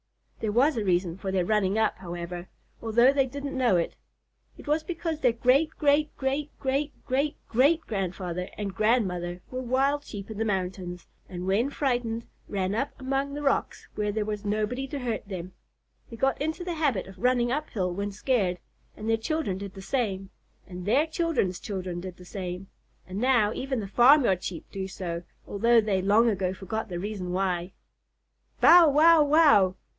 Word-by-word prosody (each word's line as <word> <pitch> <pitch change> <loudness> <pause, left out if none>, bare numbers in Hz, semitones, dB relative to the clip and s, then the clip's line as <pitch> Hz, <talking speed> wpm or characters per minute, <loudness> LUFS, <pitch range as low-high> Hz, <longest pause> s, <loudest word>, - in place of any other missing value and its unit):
There 215 - -1
was 270 +8 +3
a 220 - -1
reason 180 -1 0
for 195 -1 -3
their 185 -2 +1
running 210 0 +1
up, 220 -4 +1
however, 175 0 -6 0.3
although 235 +4 +4
they 270 -2 +2
didn't 280 +2 -6
know 250 -7 +3
it. 170 -1 0 0.6
It - - -12
was 305 +2 +2
because 330 -1 -3
their 250 -5 +3
great 255 +6 +3
great 295 0 +2
great 280 +2 -1
great 275 +2 -1
great 275 +3 0
great 285 +8 +3
grandfather 180 -3 -3
and 200 -2 -3
grandmother 180 -6 0
were 255 0 -3
wild 270 +4 +1
Sheep 205 -4 -8
in 215 - -7
the - - +2
mountains, 185 -3 -3 0.2
and 180 -1 -6
when 205 +8 +1
frightened 240 -5 -1 0.2
ran 190 -1 -1
up 270 +6 -3
among 270 +1 -2
the 295 - -5
rocks 275 - -1
where 210 -1 -1
there 210 0 -1
was 210 -1 -4
nobody 215 +6 -1
to 285 - -5
hurt 235 -5 -3
them. 185 -2 -6 0.6
They 230 - -8
got 270 +3 0
into 315 +4 -2
the 350 -1 -3
habit 285 - 0
of 190 -1 -13
running 245 +1 +2
up 300 +3 -2
hill 180 -4 -2
when 200 +2 -3
scared, 200 -4 0 0.4
and 215 - -6
their 225 0 +3
children 225 - -2
did 200 -1 -7
the 195 - -9
same, 195 -6 -2 0.3
and 180 -1 -8
their 280 +9 +4
children's 320 - -1
children 185 -4 -5
did 180 -1 -8
the 180 - -13
same, 180 -1 -5 0.4
and 185 +2 -6
now 240 -4 +3
even 265 -1 -2
the 200 - -4
farmyard 240 -3 +5
Sheep 170 -4 -5
do 190 -1 -4
so, 175 -3 -5 0.2
although 230 +3 +3
they 205 -4 +1
long 210 +5 +4
ago 190 -4 0
forgot 220 +3 -4
the 175 - -4
reason 190 -1 -4
why. 180 -1 -1 0.9
"Bow 340 -2 +8
wow 310 +2 +6
wow!" 285 - +5
215 Hz, 180 wpm, -27 LUFS, 190-270 Hz, 0.9 s, Bow